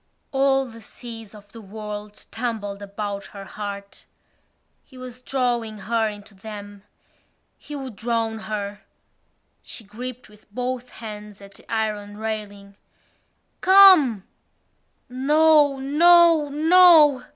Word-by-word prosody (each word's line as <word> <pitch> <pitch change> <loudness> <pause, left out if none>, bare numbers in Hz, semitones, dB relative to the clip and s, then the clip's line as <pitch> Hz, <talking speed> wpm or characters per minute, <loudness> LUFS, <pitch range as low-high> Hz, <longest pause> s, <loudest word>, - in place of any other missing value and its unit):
All 270 -1 +2
the 230 -2 -12
seas 225 -1 -11
of 205 -1 -16
the 230 - -12
world 210 0 -9
tumbled 220 -4 -4
about 200 0 -6
her 195 - -8
heart. 200 0 -8 0.8
He 260 - -18
was 255 -1 -10
drawing 240 -4 -2
her 220 +2 -1
into 205 0 -12
them: 205 0 -10 0.7
he 295 - -10
would 265 -7 -8
drown 225 -1 -2
her. 205 -1 -5 0.8
She 230 - -10
gripped 245 +4 -9
with 210 -1 -22
both 250 +2 -4
hands 210 -2 -10
at 200 0 -14
the - - -15
iron 210 -2 -3
railing. 205 -2 -6 0.8
"Come!" 365 - +6 0.8
No! 295 +2 +3
No! 325 +2 +4
No! 315 -2 +6
225 Hz, 115 wpm, -22 LUFS, 205-270 Hz, 0.8 s, Come